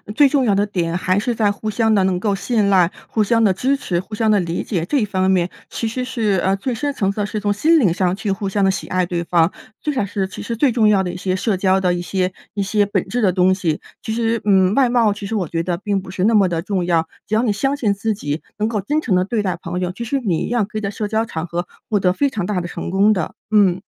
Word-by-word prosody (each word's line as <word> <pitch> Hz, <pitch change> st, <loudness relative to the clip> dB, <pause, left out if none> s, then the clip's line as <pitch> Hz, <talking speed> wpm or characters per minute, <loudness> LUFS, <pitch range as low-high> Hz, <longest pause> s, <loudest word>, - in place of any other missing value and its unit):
最 285 Hz, +2 st, +6 dB
重 270 Hz, -2 st, +2 dB
要 210 Hz, -, +3 dB
的 200 Hz, +1 st, +2 dB
点 170 Hz, -4 st, -2 dB
还 185 Hz, +1 st, +1 dB
是 235 Hz, +4 st, 0 dB
在 215 Hz, -2 st, +2 dB
互 215 Hz, +1 st, -4 dB
相 220 Hz, 0 st, +2 dB
地 195 Hz, -, +3 dB
能 185 Hz, -1 st, +1 dB
够 200 Hz, 0 st, 0 dB
信 210 Hz, 0 st, 0 dB
赖、 185 Hz, -3 st, +4 dB, 0.2 s
互 215 Hz, -, +1 dB
相 230 Hz, +2 st, +2 dB
地 205 Hz, -, +5 dB
支 260 Hz, +9 st, +1 dB
持、 175 Hz, -10 st, -2 dB
互 190 Hz, +4 st, -9 dB
相 220 Hz, +1 st, +1 dB
地 210 Hz, -1 st, +4 dB
理 170 Hz, -1 st, -2 dB
解， 175 Hz, -6 st, -2 dB
这 280 Hz, +8 st, +1 dB
一 215 Hz, -, +1 dB
方 190 Hz, -2 st, 0 dB
面 180 Hz, -1 st, +2 dB, 0.2 s
其 230 Hz, -, -3 dB
实 250 Hz, +3 st, -3 dB
是， 220 Hz, -7 st, 0 dB
呃， 190 Hz, +1 st, +2 dB
最 235 Hz, +5 st, -3 dB
深 285 Hz, +5 st, -2 dB
层 195 Hz, -7 st, 0 dB
次 -, -, -11 dB
的 -, -, 0 dB
是 215 Hz, +1 st, -3 dB
从 205 Hz, 0 st, 0 dB
心 315 Hz, +11 st, +3 dB
灵 205 Hz, -, +3 dB
上 180 Hz, +1 st, 0 dB
去 210 Hz, 0 st, -2 dB
互 195 Hz, +1 st, -2 dB
相 200 Hz, +1 st, 0 dB
地 195 Hz, -, +4 dB
喜 190 Hz, -, -2 dB
爱 185 Hz, 0 st, 0 dB
对 170 Hz, -1 st, -2 dB
方， 170 Hz, 0 st, +2 dB, 0.3 s
最 300 Hz, -, -1 dB
少 255 Hz, -8 st, -1 dB
是 195 Hz, -1 st, -2 dB
其 190 Hz, -, -8 dB
实 235 Hz, -, -3 dB
最 250 Hz, +3 st, +3 dB
重 220 Hz, -2 st, +3 dB
要 205 Hz, -2 st, +4 dB
的 180 Hz, -2 st, -2 dB
一 180 Hz, -, -7 dB
些 185 Hz, 0 st, -1 dB
社 200 Hz, +1 st, 0 dB
交 190 Hz, 0 st, +2 dB
的 180 Hz, -1 st, +2 dB
一 -, -, -3 dB
些 185 Hz, +1 st, -1 dB, 0.2 s
一 205 Hz, -, -2 dB
些 205 Hz, +1 st, +1 dB
本 200 Hz, -, -1 dB
质 245 Hz, -1 st, -1 dB
的 190 Hz, -, +4 dB
东 185 Hz, 0 st, +4 dB
西。 165 Hz, -5 st, -2 dB, 0.2 s
其 220 Hz, -, -3 dB
实， 230 Hz, 0 st, 0 dB
嗯， 190 Hz, -1 st, +4 dB
外 270 Hz, -2 st, +4 dB
貌 235 Hz, -3 st, +3 dB
其 205 Hz, 0 st, -5 dB
实 210 Hz, -, -4 dB
我 185 Hz, -6 st, -1 dB
觉 165 Hz, +1 st, -2 dB
得 175 Hz, 0 st, -2 dB
并 200 Hz, +1 st, -1 dB
不 185 Hz, -1 st, -9 dB
是 185 Hz, 0 st, -1 dB
那 225 Hz, 0 st, +4 dB
么 195 Hz, -3 st, +5 dB
地 165 Hz, -2 st, -2 dB
重 190 Hz, -2 st, -2 dB
要， 165 Hz, -2 st, +1 dB, 0.2 s
只 215 Hz, -, -5 dB
要 220 Hz, -, +3 dB
你 235 Hz, -3 st, +1 dB
相 270 Hz, +7 st, 0 dB
信 235 Hz, -8 st, 0 dB
自 200 Hz, +2 st, -1 dB
己 150 Hz, -7 st, -3 dB, 0.2 s
能 215 Hz, -, +1 dB
够 220 Hz, -2 st, -1 dB
真 295 Hz, +11 st, 0 dB
诚 210 Hz, -10 st, 0 dB
地 180 Hz, 0 st, +2 dB
对 215 Hz, +2 st, -1 dB
待 185 Hz, -3 st, -2 dB
朋 175 Hz, +2 st, -4 dB
友， 180 Hz, -1 st, -2 dB
其 200 Hz, +6 st, -6 dB
实 275 Hz, +4 st, -1 dB
你 190 Hz, -10 st, -1 dB
一 -, -, -4 dB
样 240 Hz, -2 st, +1 dB
可 215 Hz, -, -7 dB
以 -, -, -2 dB
在 200 Hz, -1 st, -2 dB
社 210 Hz, +1 st, -3 dB
交 220 Hz, +1 st, 0 dB
场 165 Hz, -5 st, -5 dB
合 175 Hz, +1 st, -3 dB, 0.2 s
获 210 Hz, -2 st, +2 dB
得 180 Hz, -1 st, +2 dB
非 280 Hz, +8 st, +1 dB
常 205 Hz, -8 st, -3 dB
大 185 Hz, -3 st, -1 dB
的 175 Hz, -, -5 dB
成 175 Hz, -, -5 dB
功 200 Hz, +3 st, +4 dB
的。 185 Hz, -5 st, -1 dB, 0.2 s
嗯。 195 Hz, -4 st, +3 dB
200 Hz, 325 characters per minute, -20 LUFS, 185-220 Hz, 0.3 s, 最